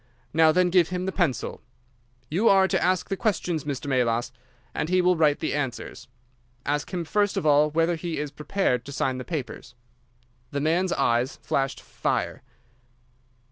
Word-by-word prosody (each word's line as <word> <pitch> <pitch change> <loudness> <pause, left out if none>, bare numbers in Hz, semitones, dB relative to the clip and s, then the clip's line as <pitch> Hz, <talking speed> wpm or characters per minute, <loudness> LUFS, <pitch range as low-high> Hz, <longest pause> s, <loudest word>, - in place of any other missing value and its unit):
Now, 160 0 +5
then, 180 +2 +2
give 180 -3 +4
him 180 0 -3
the 190 - -1
pencil. 170 - -1 0.7
You 190 - +2
are 190 -1 +5
to - - 0
ask 185 0 +1
the 195 - -1
questions, 175 -7 -1
Mr. 140 -1 -4
Melas, 120 -3 +1 0.4
and 150 - -2
he 185 0 +3
will 180 0 +4
write 150 -3 +3
the 155 - -1
answers. 135 -5 -4 0.6
Ask 145 +1 -1
him 175 -3 -3
first 205 +4 +1
of - - -1
all 150 0 +5
whether 165 +3 +1
he 165 0 -4
is 145 -1 -3
prepared 150 -6 -1
to 140 - -8
sign 130 -2 -1
the - - -5
papers?' 125 -5 -6 0.7
"The 140 - -3
man's 170 +5 +1
eyes 125 0 +1
flashed 135 -1 -1
fire. - - -2
155 Hz, 170 wpm, -25 LUFS, 140-180 Hz, 0.7 s, Now